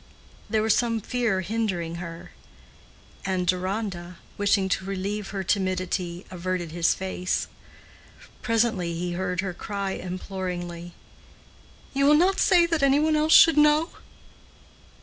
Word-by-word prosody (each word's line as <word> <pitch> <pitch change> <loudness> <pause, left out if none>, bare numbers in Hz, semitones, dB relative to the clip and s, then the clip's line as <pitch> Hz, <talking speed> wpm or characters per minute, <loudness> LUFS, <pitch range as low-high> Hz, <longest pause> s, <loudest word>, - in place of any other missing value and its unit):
There 220 -1 +1
was 220 - +3
some 230 -2 0
fear 225 -4 -1
hindering 185 -5 -2
her, 165 -1 -8 0.9
and 185 -2 -1
Deronda, 180 -1 -2 0.2
wishing 200 -1 +2
to 190 - 0
relieve 195 +2 -3
her 195 -1 -4
timidity, 185 -2 -1
averted 180 -2 -3
his 170 0 +2
face. 185 -1 -2 1.0
Presently 220 -7 0
he 175 +1 -3
heard 180 0 -2
her 190 -2 -4
cry 200 +1 -4
imploringly, 180 -2 -5 1.0
"You 275 0 +2
will 300 +1 +6
not 375 +4 +3
say 350 -2 +5
that 330 -3 0
any 275 +1 +4
one 310 +1 +2
else 310 +1 +3
should 325 -2 +8
know?" 300 +3 +4
190 Hz, 130 wpm, -25 LUFS, 180-230 Hz, 1.0 s, should